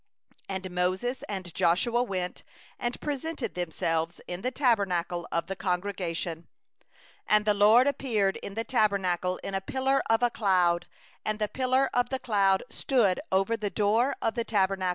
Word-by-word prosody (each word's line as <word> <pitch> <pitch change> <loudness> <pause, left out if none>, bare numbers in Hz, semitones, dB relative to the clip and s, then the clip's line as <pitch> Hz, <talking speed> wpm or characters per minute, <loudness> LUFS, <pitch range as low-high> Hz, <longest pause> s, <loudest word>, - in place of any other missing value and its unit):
And 190 -1 -4
Moses 185 +8 -1
and 190 -4 -5
Joshua 190 +7 +2
went, 185 -6 -3 0.4
and 240 0 -2
presented 290 -4 -3
themselves 165 -1 -2
in 175 +1 -5
the 255 - 0
tent 250 -4 +2
of 200 - 0
meeting. 175 -1 -2
15And 180 -2 -2 1.0
the 210 - +4
LORD 215 +5 +6
appeared 235 -8 0
in 200 - -8
the 225 - -1
Tent 220 -4 +2 0.5
in 195 - -5
a 195 - -1
pillar 265 +6 +1
of 230 +1 +3
cloud; 180 -4 +2 0.4
and 215 0 -1
the 210 0 0
pillar 260 +3 +1
of 245 0 +1
cloud 195 -4 +3
stood 230 -9 +2
over 195 +4 +2
the 210 -2 -3
door 225 +7 +2
of 225 - +1
the 235 - -1
Tent. 195 -3 +1
205 Hz, 150 wpm, -28 LUFS, 185-240 Hz, 1.0 s, LORD